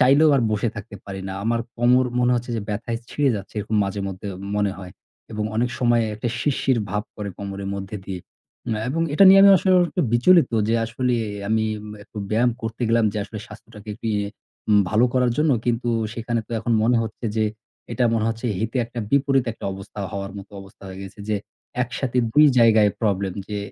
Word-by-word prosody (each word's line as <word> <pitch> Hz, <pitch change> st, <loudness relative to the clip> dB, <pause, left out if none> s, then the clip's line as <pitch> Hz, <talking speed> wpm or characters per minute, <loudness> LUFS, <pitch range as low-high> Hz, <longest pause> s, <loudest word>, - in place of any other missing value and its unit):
চাইলেও 140 Hz, +4 st, +6 dB
আর 125 Hz, -, +2 dB
বসে 110 Hz, +2 st, 0 dB
থাকতে 105 Hz, -1 st, -8 dB
পারি 95 Hz, -1 st, -6 dB
না। -, -, -4 dB
আমার 115 Hz, +1 st, +1 dB, 0.2 s
কোমর 125 Hz, +2 st, +4 dB
মনে 125 Hz, 0 st, +3 dB
হচ্ছে 120 Hz, 0 st, -3 dB
যে -, -, -2 dB
ব্যথায় 115 Hz, +2 st, -3 dB
ছিঁড়ে 145 Hz, -2 st, +2 dB
যাচ্ছে 100 Hz, +2 st, -9 dB
এরকম 110 Hz, +1 st, -2 dB
মাঝেমধ্যে 100 Hz, 0 st, -4 dB, 0.3 s
মনে 105 Hz, -2 st, +1 dB
হয় 90 Hz, -2 st, -9 dB, 0.4 s
এবং 105 Hz, 0 st, -2 dB
অনেক 120 Hz, +2 st, +1 dB
সময় 120 Hz, -1 st, +3 dB
একটা 110 Hz, +3 st, -3 dB
শিরশির 130 Hz, -2 st, +1 dB
ভাব 105 Hz, +2 st, -1 dB
করে 105 Hz, -1 st, -4 dB
কোমরের 100 Hz, -1 st, -5 dB
মধ্যে 100 Hz, +1 st, -5 dB
দিয়েই। 95 Hz, -3 st, -6 dB, 0.5 s
আ -, -, -3 dB
এবং 165 Hz, +5 st, 0 dB
এটা 195 Hz, -, +7 dB
নিয়ে 195 Hz, +1 st, +9 dB
আমি 200 Hz, -, +9 dB
আস -, -, -2 dB, 0.3 s
একটু 180 Hz, -, -1 dB
বিচলিত 165 Hz, +5 st, +5 dB, 0.2 s
যে 115 Hz, -, +2 dB
আসলে 125 Hz, +2 st, -1 dB, 0.3 s
আমি 110 Hz, 0 st, +2 dB, 0.4 s
একটু 105 Hz, +1 st, -11 dB
ব্যায়াম 120 Hz, +3 st, +3 dB
করতে 115 Hz, +2 st, -4 dB
গেলাম 115 Hz, 0 st, +3 dB
যে -, -, -6 dB
আসলে 110 Hz, -, -8 dB
স্বাস্থ্যটাকে 105 Hz, 0 st, -13 dB
একটু 115 Hz, -, -8 dB
ইয়ে 105 Hz, 0 st, -1 dB, 0.6 s
ভালো 110 Hz, +3 st, +4 dB
করার 125 Hz, -1 st, +2 dB
জন্য। 150 Hz, 0 st, +3 dB
কিন্তু 120 Hz, 0 st, 0 dB, 0.3 s
সেখানে 115 Hz, 0 st, -2 dB
তো -, -, -26 dB
এখন 115 Hz, +2 st, -1 dB
মনে 120 Hz, +2 st, +3 dB
হচ্ছে 115 Hz, +2 st, -7 dB
যে 110 Hz, -, +2 dB, 0.5 s
এটা 120 Hz, +2 st, +1 dB
মনে 110 Hz, -1 st, +1 dB
হচ্ছে 115 Hz, +2 st, -3 dB
হিতে 115 Hz, +3 st, -2 dB
একটা 120 Hz, +1 st, -9 dB
বিপরীত 135 Hz, -2 st, +3 dB
একটা -, -, -11 dB
অবস্থা 95 Hz, +2 st, -10 dB
হওয়ার 100 Hz, -1 st, -5 dB
মতো 100 Hz, -, -12 dB
অবস্থা 95 Hz, +2 st, -16 dB
হয়ে 95 Hz, 0 st, -9 dB
গেছে 95 Hz, +1 st, -11 dB
যে 105 Hz, -, +1 dB, 0.5 s
একসাথে 125 Hz, 0 st, -2 dB
২ 150 Hz, +4 st, +7 dB
জায়গায় 110 Hz, -3 st, +5 dB
problem। 100 Hz, -4 st, 0 dB, 0.2 s
যে 105 Hz, -, -3 dB
115 Hz, 195 wpm, -23 LUFS, 105-125 Hz, 0.6 s, নিয়ে